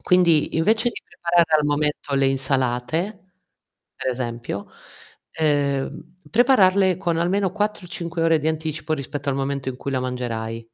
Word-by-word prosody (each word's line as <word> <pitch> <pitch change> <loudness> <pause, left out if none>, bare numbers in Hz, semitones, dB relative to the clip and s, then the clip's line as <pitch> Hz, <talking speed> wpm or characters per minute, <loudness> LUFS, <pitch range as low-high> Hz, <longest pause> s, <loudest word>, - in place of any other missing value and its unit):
Quindi, 170 -4 +3
invece 220 +8 +3
di - - -5
preparare 170 -2 +1
al 150 - +1
momento 145 -1 0
le 135 0 +3
insalate, 135 - -1 0.6
per 130 - -2
esempio, 120 -4 -4 0.6
ehm, 145 +2 -1
prepararle 200 -7 +4
con 170 -3 -1
almeno 185 +2 +1
4 210 -2 -2
o - - -14
5 170 -3 -4
ore 165 -1 +4
di 155 +1 -1
anticipo 160 0 -2
rispetto 140 0 -5
al 135 - +1
momento 135 -1 -2
in 125 - -4
cui 140 - -5
la 130 - 0
mangerai. 115 -3 -4
155 Hz, 150 wpm, -22 LUFS, 135-180 Hz, 0.6 s, prepararle